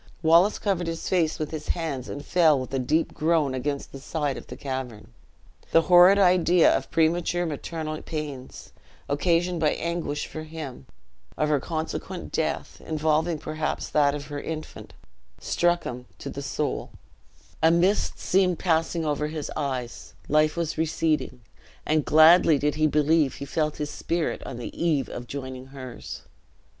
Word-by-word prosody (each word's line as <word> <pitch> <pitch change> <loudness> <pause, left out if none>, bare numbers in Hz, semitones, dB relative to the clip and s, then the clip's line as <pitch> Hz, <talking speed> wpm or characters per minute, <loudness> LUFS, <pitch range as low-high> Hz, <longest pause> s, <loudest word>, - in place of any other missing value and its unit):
Wallace 170 +6 +5
covered 185 -4 -1
his 165 0 -4
face 170 -4 +1
with 155 - -4
his 155 -1 -6
hands 145 -7 -3
and 145 - -6
fell 160 -5 +4
with 130 +1 -6
a 135 - +1
deep 155 +6 0
groan 155 -4 +1
against 140 +2 -3
the 135 - -9
side 145 -1 -2
of - - -9
the - - -9
cavern. 130 -5 -6 0.6
The 165 - +5
horrid 180 +3 +7
idea 180 -3 +5
of - - -3
premature 170 +2 +1
maternal 155 0 -4
pains, 145 -5 -7 0.4
occasioned 170 +4 +1
by 155 -2 +2
anguish 170 -3 -3
for 155 - -7
him; 155 - -8 0.5
of 150 - +1
her 150 -2 +3
consequent 160 +3 -5
death, - - -2
involving 160 +1 0
perhaps 155 +1 -3
that 145 -1 +3
of 145 -1 -6
her 145 0 -6
infant, 155 -1 -7 0.4
struck 175 0 +1
him 125 0 -6
to - - -7
the - - -6
soul; - - -3 0.7
a 160 - +6
mist 175 +5 +2
seemed 185 -2 +2
passing 165 -1 0
over 150 0 0
his 155 -1 -5
eyes; 130 -5 -4
life 155 +2 +2
was 165 -2 -2
receding; 155 -5 0 0.4
and 155 -1 +1
gladly 160 0 +6
did 150 +1 0
he 155 0 +2
believe 150 -1 +2
he 140 - -6
felt 155 +1 -1
his 150 -1 -3
spirit 170 -1 -2
on 120 - -6
the 120 - -6
eve 155 -5 +1
of 120 0 -7
joining 130 -1 -6
hers. 130 -3 -9
155 Hz, 160 wpm, -25 LUFS, 145-165 Hz, 0.7 s, horrid